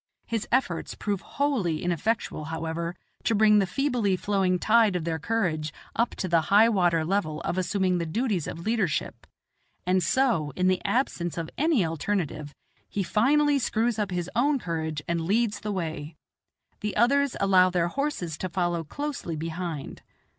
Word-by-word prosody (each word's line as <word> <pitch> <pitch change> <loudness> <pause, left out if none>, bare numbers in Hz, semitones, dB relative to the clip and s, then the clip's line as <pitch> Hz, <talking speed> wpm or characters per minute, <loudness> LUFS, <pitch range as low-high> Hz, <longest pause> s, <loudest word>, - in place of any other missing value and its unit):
His 225 -3 -3
efforts 235 -10 0
prove 200 -2 -2
wholly 230 - -1
ineffectual, 175 -1 -1
however, 165 +2 -3 0.3
to 225 - +2
bring 210 0 +5
the 195 - +1
feebly 240 -4 +1
flowing 190 -1 +1
tide 215 0 +4
of 175 - -1
their 160 0 -2
courage 160 -6 -1 0.2
up 235 +1 0
to 185 - -3
the 170 -2 +3
high 215 +3 +6
water 175 -6 +2
level 155 -4 -1
of - - -2
assuming 185 0 +1
the 170 - -2
duties 205 - -1
of 165 +1 -6
leadership, 215 -7 -1 0.6
and 185 +1 +2
so 170 - +1
in 185 0 +1
the 185 0 +1
absence 175 - -1
of 165 -1 -4
any 295 - +2
alternative, 160 -3 -3 0.3
he 200 - -1
finally 285 +9 +3
screws 230 -2 0
up 210 - 0
his 180 -2 -2
own 280 +5 +3
courage 160 - -3
and 170 -1 0
leads 210 +4 +1
the 210 - -4
way. 160 -4 -4 0.6
The 210 -1 -3
others 280 +4 +3
allow 185 -2 +5
their 175 -1 +1
horses 185 - -3
to 185 - -3
follow 175 -2 -1
closely 275 - -4
behind. 165 -1 -5
185 Hz, 160 wpm, -26 LUFS, 165-225 Hz, 0.6 s, high